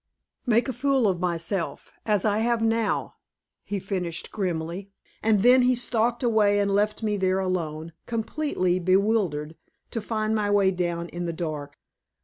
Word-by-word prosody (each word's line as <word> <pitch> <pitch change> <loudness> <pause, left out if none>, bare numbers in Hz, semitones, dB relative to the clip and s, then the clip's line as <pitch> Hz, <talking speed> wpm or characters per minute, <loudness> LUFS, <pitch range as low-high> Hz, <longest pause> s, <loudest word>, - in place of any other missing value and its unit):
"Make 235 +2 +3
a 260 - -2
fool 265 -1 +2
of 185 -3 0
myself, 170 -3 -3 0.2
as 210 -2 +2
I 210 0 +2
have 235 +1 +1
now," 225 -1 0 0.5
he 205 - -3
finished 185 -4 -3
grimly. 180 -1 -3 0.3
And 215 -2 +3
then 250 +2 +7
he 250 0 +3
stalked 240 0 0
away 215 -4 +3
and 200 -1 +1
left 210 +2 +1
me 210 -1 0
there 190 -1 +1
alone, 165 -4 -2
completely 225 -6 -1
bewildered, 185 -5 +1 0.3
to 230 - -3
find 215 0 -1
my 210 -2 0
way 200 -2 +4
down 175 -2 -2
in 175 0 -5
the 170 - -2
dark. 150 -4 -5
200 Hz, 155 wpm, -25 LUFS, 175-225 Hz, 0.5 s, then